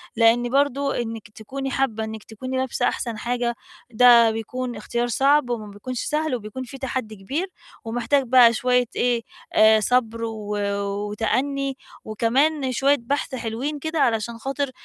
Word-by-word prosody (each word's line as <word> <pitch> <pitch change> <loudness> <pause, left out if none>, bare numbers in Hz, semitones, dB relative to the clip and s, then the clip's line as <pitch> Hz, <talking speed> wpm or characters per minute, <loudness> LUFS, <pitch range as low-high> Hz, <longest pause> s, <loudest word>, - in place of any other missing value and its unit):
لإن 235 +1 +4
برضه 280 +1 +1
إنّك 225 -2 -6
تكوني 265 +6 -6
حابّة 225 -5 0
إنّك 220 -1 -6
تكوني 255 +4 -6
لابسة 260 -1 -1
أحسن 235 -3 -2
حاجة، 240 0 -1 0.4
ده 235 -1 +7
بيكون 240 +2 -4
اختيار 235 +3 -2
صعب 275 +2 +3
وما 215 -4 -4
بيكونش 240 +5 -6
سهل، 305 -3 -1
وبيكون 225 +3 -6
فيه 265 +2 -9
تحدّي 255 -5 -4
كبير 275 - -3 0.4
ومحتاج 245 +5 +1
بقى 245 -2 +6
شويّة 250 +1 +2
إيه، 240 -1 +1 0.3
آآ، 220 0 +6
صبر، 230 0 +1
و 210 -2 -4 0.5
وتأني 270 +5 -1 0.3
وكمان 260 +6 +1
شويّة 275 +3 +3
بحث 270 +2 -2
حلوين 250 +6 -3
كده 315 +1 -3
علشان 230 -2 +1
خاطر 275 +2 -3
245 Hz, 145 wpm, -23 LUFS, 225-270 Hz, 0.5 s, ده